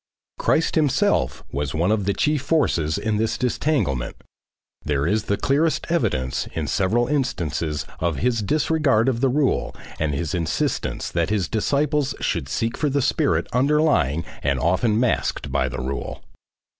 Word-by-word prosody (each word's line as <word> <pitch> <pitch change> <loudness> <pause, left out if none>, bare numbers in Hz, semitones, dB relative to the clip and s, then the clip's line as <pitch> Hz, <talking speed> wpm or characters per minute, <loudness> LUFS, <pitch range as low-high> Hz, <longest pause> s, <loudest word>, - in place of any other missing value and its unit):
Christ 165 - +2
himself 150 -5 +1
was 70 0 -3
one 85 +6 +2
of 105 -3 +1
the 100 - +1
chief 150 -2 +1
forces 120 - +1
in 110 -2 -1
this 110 +1 0
disentanglement, 125 - 0 0.7
there 70 -1 0
is 105 +4 +1
the 100 - 0
clearest 155 +4 +1
evidence 65 - 0
in 80 -2 -2
several 105 +10 +1
instances 85 - -1
of 85 -1 0
his 115 - 0
disregard 140 -1 +2
of 125 -3 0
the 135 - +3
rule 140 +1 0 0.2
and 75 -2 0
his 80 0 -2
insistence 85 -3 -1
that 85 +1 0
his 105 -4 0
disciples 145 +5 0
should 65 - -2
seek 115 - -1
for 150 - +1
the 140 +1 +1
spirit 85 - +1
underlying 125 - +2 0.2
and 70 -1 0
often 105 +6 +2
masked 115 - 0
by 65 -1 +1
the 65 - -5
rule. 65 +2 -4
105 Hz, 155 wpm, -23 LUFS, -, 0.7 s, the